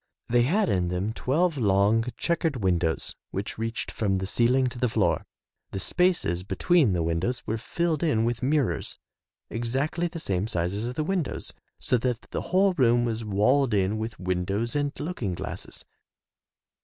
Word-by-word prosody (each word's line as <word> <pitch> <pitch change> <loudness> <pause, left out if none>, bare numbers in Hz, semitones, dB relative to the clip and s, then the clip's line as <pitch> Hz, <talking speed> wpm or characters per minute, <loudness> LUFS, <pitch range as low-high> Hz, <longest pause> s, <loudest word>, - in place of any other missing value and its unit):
They 120 0 +4
had 190 - +2
in 90 - +1
them 90 +5 -1
twelve 150 +5 +1
long, 105 +1 +3
checkered 165 -3 0
windows 90 -7 0
which 100 +3 -5
reached 115 0 -3
from 100 -3 0
the 95 - -2
ceiling 125 +6 +3
to 120 0 -9
the 125 -1 +2
floor. - - +1 0.5
The 95 - -2
spaces 175 - +1
between 140 - +3
the 85 -2 0
windows 85 +10 -1
were 110 +1 -2
filled 165 +5 -1
in 125 -9 +2
with 120 -1 -1
mirrors 140 0 0 0.5
exactly 135 +9 -1
the 170 - -7
same 100 - -1
size 90 -3 -1
as 110 +4 -2
the 155 +5 -2
windows, 180 -2 -2 0.3
so 125 - +1
that 125 -1 -1
the - - -2
whole 190 +1 +4
room 120 -6 +3
was 115 -1 -2
walled 110 +5 +2
in 100 +2 +1
with 110 -1 -5
windows 95 +6 -1
and 145 -1 +1
looking 120 - -3
glasses. - - -6
115 Hz, 165 wpm, -26 LUFS, 100-145 Hz, 0.5 s, They